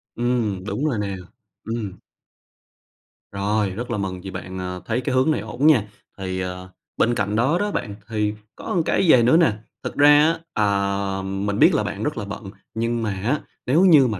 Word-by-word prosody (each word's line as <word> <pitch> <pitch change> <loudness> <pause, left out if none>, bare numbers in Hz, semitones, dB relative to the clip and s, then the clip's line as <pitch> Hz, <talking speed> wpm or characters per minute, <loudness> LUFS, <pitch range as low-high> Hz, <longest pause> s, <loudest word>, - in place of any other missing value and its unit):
Ừm, 115 -6 0
đúng 105 +9 -2
rồi 130 -8 0
nè, 100 -1 -2 0.5
ừm. 110 -4 -4 1.3
Rồi, 100 +1 0
rất 120 +6 -5
là 115 - -1
mừng 95 -2 -3
vì 95 - -7
bạn, 95 0 -6
à, 90 0 -4
thấy 120 +2 -1
cái 130 - -1
hướng 130 +5 +3
này 155 - 0
ổn 135 +5 0
nha. 135 -10 +6 0.3
Thì, 95 -1 -3
ờ, 90 0 -5 0.3
bên 120 +1 +2
cạnh 100 0 -1
đó 135 +9 +2
đó 205 0 0
bạn, 100 - -3
thì 105 -1 0 0.2
có - - -5
một 175 - +3
cái - - +2
vậy 120 -5 +7
nữa 125 +7 +5
nè, 165 -8 +5 0.3
thực - - -5
ra 145 +1 +6
á, 160 +3 +3 0.3
ờ, 100 -1 0
mình 100 +1 -2
biết - - +6
là - - +2
bạn - - -4
rất - - -2
là 105 - -3
bận 100 -1 -7 0.2
nhưng 115 +1 -1
mà 110 - 0
á, 115 +10 -1 0.3
nếu 145 +8 +3
như 150 -8 +7
mà 105 -4 -3
105 Hz, 205 wpm, -22 LUFS, 100-125 Hz, 1.3 s, vậy